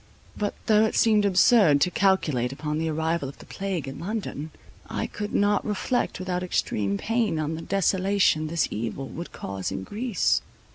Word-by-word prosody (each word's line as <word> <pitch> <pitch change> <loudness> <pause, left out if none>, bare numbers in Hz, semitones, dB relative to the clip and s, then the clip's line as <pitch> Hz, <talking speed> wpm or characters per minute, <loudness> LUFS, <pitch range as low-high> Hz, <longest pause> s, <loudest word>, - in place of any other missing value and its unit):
But, 205 -1 -2
though 215 0 +5
it 220 - -2
seemed 215 -2 +4
absurd 190 -5 +5
to 180 - +3
calculate 155 -12 +2
upon 150 +2 -3
the 160 0 -1
arrival 160 -2 -1
of 140 - -12
the - - -13
plague 190 -7 -4
in 135 - -7
London, 185 -6 -4 0.4
I - - -2
could 210 0 -5
not 205 0 +2
reflect 215 +4 -1
without 180 -1 -2
extreme 100 - -1
pain 225 - 0
on 155 0 -1
the 160 - -5
desolation 190 -3 +2
this 165 -1 0
evil 115 +5 -4
would 170 +2 -7
cause 95 -1 -5
in 95 0 -4
Greece. 215 - 0
180 Hz, 175 wpm, -26 LUFS, 150-205 Hz, 0.4 s, though